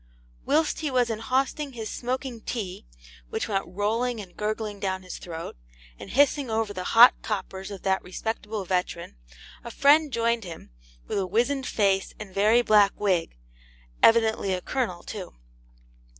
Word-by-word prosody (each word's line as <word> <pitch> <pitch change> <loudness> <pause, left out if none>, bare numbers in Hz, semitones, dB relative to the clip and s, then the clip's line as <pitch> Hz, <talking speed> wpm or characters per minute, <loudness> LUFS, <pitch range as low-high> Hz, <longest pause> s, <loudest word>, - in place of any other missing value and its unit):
Whilst 305 +2 +2
he 310 - -2
was 250 -3 +1
inhausting 260 +5 -1
his 225 -2 -5
smoking 250 -1 -4
tea, 195 - -5 0.4
which - - -2
went 195 -2 -1
rolling 220 +6 -1
and 185 -4 -10
gurgling 215 -1 -3
down 190 -1 -2
his 185 - -8
throat, 165 -1 -7 0.4
and - - -9
hissing 285 0 +2
over 220 -2 -1
the 185 -2 -5
'hot 240 +2 +10
coppers' 190 -2 -4
of 200 -2 -9
that 190 -1 +1
respectable 210 +2 -4
veteran, 180 - -2 0.5
a 235 - -7
friend 290 +5 +4
joined 235 -1 +1
him, 165 - -10 0.3
with - - -2
a 190 - -1
wizened 250 +7 0
face 195 -2 +1
and 205 -3 -9
very 215 +5 +4
black 205 -3 +4
wig, 180 - 0 0.6
evidently 220 -4 +4
a 180 - -5
Colonel 220 -10 -2
too. 195 -4 -8
215 Hz, 150 wpm, -26 LUFS, 190-240 Hz, 0.6 s, hot